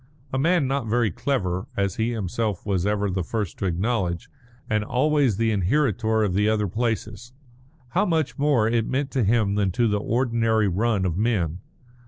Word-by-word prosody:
A 130 - +1
man 170 +1 +3
not 135 -3 -1
very 115 -2 +1
clever, 95 - -2
as 100 -2 0
he 110 +1 +1
himself 110 -2 -2
was 95 -2 0
ever 105 0 0
the 95 -1 -1
first 105 0 -4
to 95 - -1
acknowledge, 90 -1 -1 0.4
and 110 -1 0
always 130 -1 +1
the 115 0 +1
inheritor 110 - +1
of 100 -4 0
the 105 +3 +2
other 105 -1 +1
places, 115 +2 -3 0.6
how 190 - +1
much 160 -6 -1
more 140 -7 +3
it 115 -1 +1
meant 135 +1 -1
to 130 - +1
him 105 -1 +2
than 100 -1 +1
to 120 +3 +2
the 105 -1 +1
ordinary 115 -2 +1
run 100 +1 +1
of 85 -2 -1
men! 95 -7 0
110 Hz, 180 wpm, -24 LUFS, 100-120 Hz, 0.6 s, man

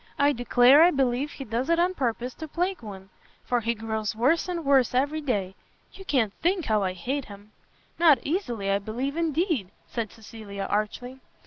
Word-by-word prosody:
I 285 +1 +4
declare 245 +3 +5
I 340 - +8
believe 270 -1 0
he 275 - -7
does 235 +5 -2
it 335 - +3
on 355 +2 +2
purpose 245 -4 -2
to 315 - -8
plague 355 +5 -2
one, 195 -3 -10 0.4
for 245 - +1
he 230 +1 -1
grows 220 -1 -3
worse 280 +11 +2
and 340 -3 -3
worse 270 -3 +3
every 290 +4 +1
day. 205 -10 -2 0.4
You 385 - -12
can't 235 - +1
think 355 -1 +1
how 215 -2 +1
I 185 -1 -1
hate 255 +10 -3
him!" 205 +1 -13 0.5
"Not 320 -5 +6
easily, 240 - -2
I 200 - +2
believe 245 +8 -4
indeed!" 325 - 0 0.2
said 230 -3 -4
Cecilia, 215 -3 -8
archly. 245 +5 -3
250 Hz, 185 wpm, -26 LUFS, 215-305 Hz, 0.5 s, I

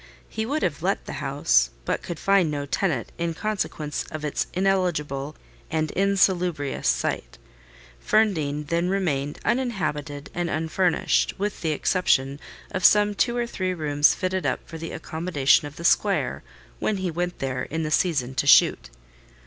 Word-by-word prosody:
He 220 0 -4
would 300 +4 -1
have 145 - -1
let 195 +3 -1
the - - -6
house, 135 - +2 0.2
but - - -1
could 170 - -6
find 195 -2 +3
no 145 -1 -3
tenant, 170 +5 -1
in 170 -1 -1
consequence 190 -8 -3
of 155 -1 -5
its 150 - -1
ineligible 155 -7 0 0.3
and 155 -1 -1
insalubrious 180 -6 +1
site. - - -1 0.7
Ferndean 155 -9 +1
then 170 +1 +1
remained 150 -7 -1
uninhabited 190 - -2
and 175 -1 -2
unfurnished, 165 +3 +1
with 205 +1 -3
the 160 - 0
exception 145 -4 +1 0.3
of 185 - -3
some 210 0 +5
two 240 +4 +1
or 240 - 0
three 185 -5 -2
rooms 150 -2 +3
fitted 185 -1 -2
up - - -2
for 165 - -8
the 165 - -6
accommodation 160 -3 +1
of 145 - -12
the 170 - -7
squire - - +2 0.4
when 210 - 0
he 185 -2 -2
went 175 +2 -3
there 130 -2 -3
in 160 +5 -3
the 155 - -3
season 145 -8 +1
to 140 - -1
shoot. - - +5
165 Hz, 155 wpm, -24 LUFS, 145-190 Hz, 0.7 s, some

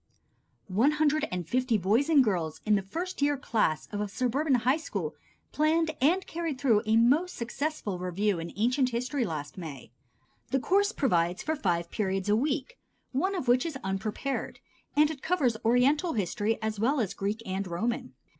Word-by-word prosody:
One 225 +10 +3
hundred 305 0 +2
and 180 -2 -3
fifty 250 +1 +1
boys 215 - +2
and 295 -4 +6
girls 175 -8 -1
in 215 - +3
the 200 - +3
first 335 - -5
year 290 0 +2
class 220 - 0
of 205 -1 -3
a 210 - -1
suburban 255 +7 +1
high 250 +4 +2
school 320 - -4 0.4
planned 315 +1 +2
and 355 +8 +3
carried 325 -5 -4
through 230 -7 +3
a 220 +1 +4
most 285 +10 +3
successful 235 - -3
review 185 +1 0
in 165 +1 -6
Ancient 250 +5 +2
History 250 +2 -1
last 155 +2 -5
May. 145 -9 -8 0.6
The 270 - +1
course 400 - +2
provides 180 - +1
for 315 - -1
five 170 - -1
periods 195 -2 -1
a 210 - +5
week 280 - -1 0.3
(one 375 +9 0
of 310 -9 -3
which 245 +1 +4
is 320 -5 -4
unprepared), 205 +8 -3 0.4
and 300 +1 +4
it 280 -4 -8
covers 295 -10 +1
Oriental 270 +9 +3
History 210 +2 0
as 215 -1 -2
well 265 +7 +2
as 215 -6 -1
Greek 205 +3 -3
and 190 +1 -3
Roman. 175 - -3
240 Hz, 175 wpm, -28 LUFS, 195-295 Hz, 0.6 s, and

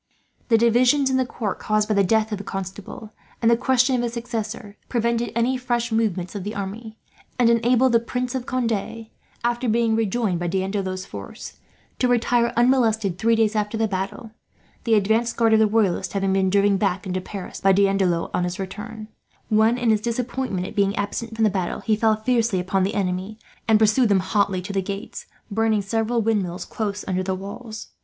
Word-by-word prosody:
The 230 - +4
divisions 250 +4 +3
in 260 - +2
the 260 -1 +1
court, 210 -6 -4
caused 215 0 0
by 215 - +1
the 200 -1 +3
death 220 +3 +2
of 210 - -3
the - - -6
Constable 195 +3 -7 0.3
and 230 0 +3
the - - +6
question 255 +1 +2
of 245 - 0
his 235 -1 -2
successor, 230 -3 -5
prevented 235 -1 0
any 240 +3 +1
fresh 240 -1 -1
movements 200 -6 -1
of 200 -3 -5
the 210 +3 -5
army; 215 +3 -6 0.4
and 240 -2 +4
enabled 245 +2 +3
the 230 - +5
Prince 250 +2 -3
of 255 -2 -4
Conde, 230 -3 -2 0.3
after 240 +1 0
being 225 0 +2
rejoined 220 -4 0
by 175 - -2
D'Andelot's 190 0 -2
force, - - -9 0.4
to 250 - +3
retire 240 -1 +2
unmolested 225 -7 +2
three 230 0 +3
days 220 -1 +2
after 210 +1 -1
the 220 0 +1
battle; 195 +3 -4 0.5
the 230 -2 +4
advanced 220 +3 +1
guard 225 -1 +3
of 220 - +5
the 220 - +5
Royalists 210 -4 0
having 195 -1 0
been 190 -1 +2
driven 200 +1 +3
back 190 -1 -1
into 185 0 -2
Paris 195 0 -8
by 195 - +4
D'Andelot 195 -3 +2
on 180 - 0
his 180 +1 -3
return 215 +3 -7 0.4
when, 220 +2 +3
in 240 -2 +2
his 215 -1 +2
disappointment 235 -4 -2
at 205 - -8
being 200 -1 +2
absent 225 +2 -3
from 225 - 0
the 215 - +5
battle, 185 -3 -2
he 220 - +1
fell 220 0 +3
fiercely 225 -2 +1
upon 185 +2 0
the 190 +2 0
enemy, 190 +1 -2 0.3
and 220 -1 +5
pursued 220 +2 +3
them 195 -2 +3
hotly 190 -1 0
to 200 - -6
the 195 - +1
gates, 200 +2 -6 0.2
burning 220 -1 +1
several 225 +3 0
windmills 195 -5 -1
close 205 -2 -4
under 185 -1 0
the 190 0 -2
walls. 215 +4 -8
220 Hz, 195 wpm, -23 LUFS, 195-235 Hz, 0.5 s, the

